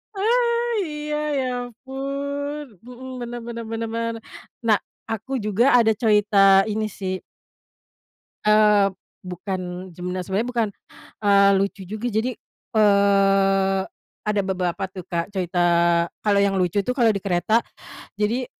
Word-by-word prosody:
Ah, 470 +3 +1 0.2
iya 300 0 -4 0.2
ya 260 - -1 0.2
ampun, 275 +4 -5 0.2
mhm, 250 +1 -10
bener 240 0 -5
bener 235 -1 -5
bener 225 0 -3
bener. 230 0 -2 0.5
Nah 215 -2 +5 0.3
aku 225 +4 -5
juga 215 +2 +2
ada 230 -2 +4
cerita 210 -2 +2 0.4
ini 215 +1 -1
sih. 190 -1 -2 1.3
Eee, 210 -1 +5 0.3
bukan 180 0 -5
sebener 180 +2 -4
sebenernya 205 +7 -1
bukan, 235 -3 0 0.5
eee, 200 -1 +5
lucu 195 0 -1
juga 215 +5 -4
jadi, 230 +3 -1 0.4
eee, 195 -2 +3 0.4
ada 210 -1 +1
beberapa 185 -2 -2
tuh 185 -1 -8
Kak 170 +2 -2
cerita 180 -1 -1 0.6
kalau 205 -2 +3
yang 200 -1 +2
lucu 180 +1 +1
tuh 250 +6 -1
kalau 235 -4 +4
di 200 - -2
kereta 195 +4 +1 0.5
jadi 220 +5 -1
210 Hz, 125 wpm, -23 LUFS, 195-240 Hz, 1.3 s, Nah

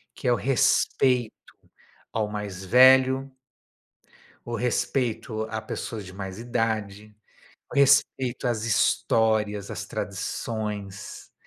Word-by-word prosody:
que 130 - -5
é - - +4
o - - +3
respeito 125 -1 +2 0.8
ao 110 -2 0
mais 100 -3 -6
velho 130 +3 +5 1.2
o 120 - -2
respeito 120 -1 -1
a 110 0 -4
pessoas 110 -1 -6
de 95 - -11
mais 95 0 -7
idade, 110 -3 -3 0.6
o - - -6
respeito 135 -2 +3
às 115 -3 -1
histórias, 110 -2 +1
às - - -5
tradições, 105 -3 -5
110 Hz, 105 wpm, -25 LUFS, 105-125 Hz, 1.2 s, velho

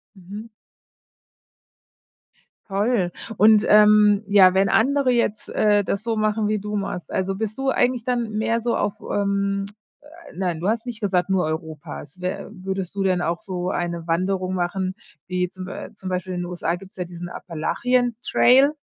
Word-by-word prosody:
Mhm. 205 +4 -9 2.2
Toll. 200 -2 0 0.3
Und, 215 0 +6
ähm 210 0 +6
ja, 195 -3 +6
wenn 195 +1 +3
andere 270 +2 +3
jetzt, 235 -3 0
äh, 205 -1 +3
das 200 - -2
so 225 -1 -1
machen 215 0 +1
wie 215 - 0
du, 210 +1 -5
machst, 195 -4 -4
also, 190 +1 -1
bist 215 +1 -4
du 270 0 0
eigentlich 250 -2 +1
dann 240 -2 -1
mehr 225 +2 0
so 235 +1 0
auf, 210 +2 -2
ähm 200 0 0 0.7
nein, 175 -3 -2
du 185 - -1
hast 230 +2 -1
nicht 235 -2 -6
gesagt, 185 -4 +1
nur 190 -1 +2
Europas. 155 +1 -6
Wär 180 0 -4
würdest 190 -2 -5
du 200 - -1
denn 185 -2 +2
auch 170 0 -1
so 180 -1 -4
eine 170 -2 -3
Wanderung 185 +2 0
machen, 185 +1 -1 0.3
wie 180 -1 -1
zum 185 0 -8
Bei 185 - -7
zum 190 - -8
Beispiel 185 0 -3
in 175 - -3
den 175 - -3
USA 175 -1 -2
gibt's 190 +1 -14
ja 180 - -3
diesen 175 0 -8
Appalachian-Trail? 245 - +2
195 Hz, 165 wpm, -23 LUFS, 180-215 Hz, 2.2 s, Und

